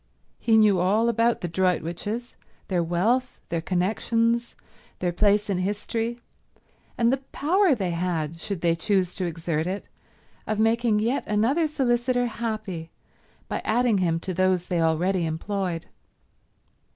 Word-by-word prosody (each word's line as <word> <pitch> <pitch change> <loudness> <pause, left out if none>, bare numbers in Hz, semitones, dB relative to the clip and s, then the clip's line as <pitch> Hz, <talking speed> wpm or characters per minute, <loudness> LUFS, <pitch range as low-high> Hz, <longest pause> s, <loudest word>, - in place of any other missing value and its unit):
He 225 -2 +3
knew 210 -4 +5
all 210 +6 +3
about 230 +1 +2
the 175 - -2
Droitwiches, 185 +6 -1 0.4
their 180 -3 +1
wealth, 215 +10 0
their 170 0 -1
connections, 230 +6 0 0.4
their 180 -1 -1
place 205 +3 +2
in 195 -3 0
history, 225 +5 -2 0.8
and 235 +1 +3
the - - +2
power 355 +2 +3
they 190 -6 -2
had, 165 -2 -2
should 195 -1 -4
they 170 -1 +3
choose 185 +1 0
to 185 - -1
exert 165 -1 -2
it, 195 +2 -4 0.6
of 215 - -1
making 225 0 +2
yet 235 +6 0
another 245 +10 +2
solicitor 245 -3 +1
happy 215 -8 -4 0.6
by - - -3
adding 230 -2 +2
him 165 -3 +1
to 185 - -4
those 185 0 +2
they 175 -2 0
already 170 +3 +1
employed. 175 +1 -3
200 Hz, 140 wpm, -25 LUFS, 175-230 Hz, 0.8 s, knew